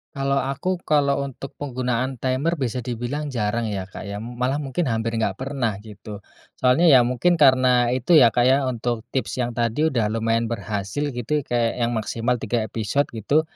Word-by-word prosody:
Kalau 140 Hz, 0 st, 0 dB
aku, 140 Hz, +8 st, -1 dB
kalau 140 Hz, -2 st, +2 dB
untuk 135 Hz, 0 st, -9 dB
penggunaan 130 Hz, -2 st, -2 dB
timer 130 Hz, +6 st, 0 dB
bisa 125 Hz, -5 st, -3 dB
di 125 Hz, -, -2 dB
bilang 135 Hz, +5 st, -4 dB
jarang 115 Hz, +1 st, -1 dB
ya 100 Hz, -3 st, -4 dB
Kak 95 Hz, -, -9 dB
ya, 100 Hz, +1 st, -5 dB
malah 125 Hz, +5 st, -2 dB
mungkin 140 Hz, +5 st, -2 dB
hampir 115 Hz, -1 st, -1 dB
nggak 110 Hz, -4 st, 0 dB
pernah 130 Hz, -5 st, -1 dB
gitu. 105 Hz, -1 st, -10 dB, 0.3 s
Soalnya 130 Hz, +7 st, +3 dB
ya 135 Hz, -6 st, +7 dB
mungkin 125 Hz, +8 st, +2 dB
karena 130 Hz, -5 st, +4 dB
itu 130 Hz, +7 st, +1 dB
ya, 120 Hz, -, +7 dB
kayak 125 Hz, +5 st, +3 dB
untuk 120 Hz, -1 st, -2 dB
tips 130 Hz, -1 st, -2 dB
yang 120 Hz, 0 st, -3 dB
tadi 120 Hz, +7 st, +1 dB
udah 110 Hz, -6 st, 0 dB
lumayan 115 Hz, +1 st, 0 dB
berhasil 110 Hz, +5 st, -3 dB
gitu, 130 Hz, +4 st, -2 dB
kayak 120 Hz, -2 st, -1 dB
yang 120 Hz, -1 st, 0 dB
maksimal 115 Hz, +3 st, -1 dB
3 115 Hz, +1 st, -1 dB
episode 110 Hz, +6 st, -1 dB
gitu. 120 Hz, +7 st, +1 dB
125 Hz, 175 wpm, -23 LUFS, 115-135 Hz, 0.3 s, ya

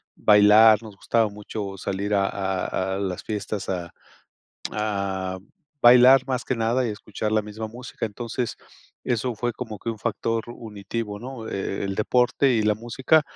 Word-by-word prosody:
bailar, 105 Hz, +1 st, +6 dB
nos 110 Hz, -3 st, -11 dB
gustaba 115 Hz, +2 st, +1 dB
mucho 100 Hz, -1 st, -6 dB
salir 100 Hz, +2 st, -3 dB
a 100 Hz, -1 st, +3 dB
a 95 Hz, -1 st, -2 dB
a -, -, -3 dB
las 95 Hz, -3 st, -3 dB
fiestas 105 Hz, -1 st, -4 dB
a 90 Hz, -3 st, -3 dB, 0.8 s
a 100 Hz, -3 st, -2 dB, 0.4 s
bailar 125 Hz, +2 st, +7 dB
más 130 Hz, -2 st, -2 dB
que -, -, -1 dB
nada 120 Hz, +2 st, +1 dB
y -, -, -2 dB
escuchar 105 Hz, +1 st, -4 dB
la 110 Hz, -, +3 dB
misma 105 Hz, +1 st, -6 dB
música. 120 Hz, +2 st, -7 dB
Entonces, 120 Hz, +3 st, -4 dB, 0.5 s
eso 120 Hz, +1 st, -1 dB
fue 120 Hz, +2 st, -2 dB
como 110 Hz, -4 st, -6 dB
que 115 Hz, -, -7 dB
un 110 Hz, -, -7 dB
factor 115 Hz, +1 st, -2 dB
unitivo, 105 Hz, -2 st, -6 dB
¿no? 120 Hz, -1 st, -8 dB
E 95 Hz, -1 st, -3 dB
el 95 Hz, 0 st, -2 dB
deporte 125 Hz, +5 st, +2 dB
y 110 Hz, -3 st, +2 dB
la 105 Hz, 0 st, +2 dB
música, 130 Hz, +7 st, +2 dB
110 Hz, 160 wpm, -24 LUFS, 100-120 Hz, 0.8 s, bailar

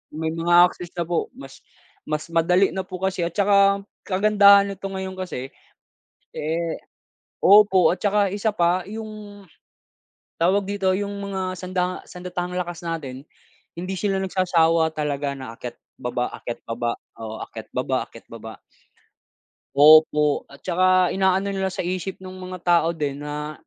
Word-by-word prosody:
may 160 Hz, 0 st, -2 dB
mga 175 Hz, +2 st, +5 dB
access 175 Hz, -, -9 dB
na 170 Hz, -, -1 dB
po, 170 Hz, 0 st, -1 dB
mas 135 Hz, -1 st, -12 dB, 0.5 s
mas 155 Hz, +2 st, -3 dB
madali 180 Hz, +3 st, +3 dB
na 190 Hz, -1 st, -4 dB
po 185 Hz, -, -7 dB
kasi 190 Hz, -2 st, -1 dB
at 170 Hz, -, -5 dB
tsaka 200 Hz, -1 st, +4 dB, 0.2 s
kagandahan 200 Hz, 0 st, +5 dB
neto 195 Hz, 0 st, -6 dB
ngayon 190 Hz, -1 st, -6 dB
kasi 155 Hz, -9 st, -5 dB, 0.9 s
eh 165 Hz, +2 st, -2 dB, 0.6 s
opo 190 Hz, -4 st, +6 dB
at 180 Hz, -, -23 dB
tsaka 205 Hz, 0 st, +2 dB
isa 205 Hz, +3 st, -1 dB
pa 175 Hz, -2 st, +1 dB
'yung 215 Hz, -2 st, -8 dB, 1.0 s
tawag 190 Hz, +4 st, +3 dB
dito, 190 Hz, -1 st, 0 dB
'yung 200 Hz, +1 st, -3 dB
mga 200 Hz, -1 st, -4 dB
sanda 185 Hz, 0 st, -3 dB
sandatahang 180 Hz, 0 st, -5 dB
lakas 175 Hz, -2 st, -4 dB
natin, 150 Hz, -5 st, -6 dB, 0.5 s
hindi 180 Hz, +2 st, -5 dB
sila 195 Hz, 0 st, 0 dB
nagsasawa 170 Hz, -3 st, +2 dB
talaga 145 Hz, -2 st, -2 dB
na 130 Hz, -3 st, -8 dB
akyat, 120 Hz, +1 st, -8 dB, 0.2 s
baba, 125 Hz, -1 st, -2 dB
akyat, 120 Hz, -, -7 dB
baba, 115 Hz, +1 st, -2 dB, 0.2 s
oo, 110 Hz, -1 st, -6 dB
akyat, -, -, -10 dB
baba, -, -, 0 dB
akyat, -, -, -14 dB
baba. -, -, -9 dB, 1.2 s
Opo 150 Hz, 0 st, +5 dB
at 140 Hz, -, -16 dB
tsaka 185 Hz, 0 st, +3 dB
inaano 190 Hz, +1 st, +1 dB
nila 190 Hz, -1 st, -1 dB
sa 180 Hz, -, -4 dB
isip 185 Hz, +1 st, -3 dB
nung 185 Hz, 0 st, -10 dB
mga 185 Hz, 0 st, -6 dB
tao 170 Hz, -2 st, +4 dB
din 145 Hz, -4 st, -3 dB
na, 150 Hz, +1 st, -5 dB
180 Hz, 145 wpm, -23 LUFS, 160-195 Hz, 1.2 s, opo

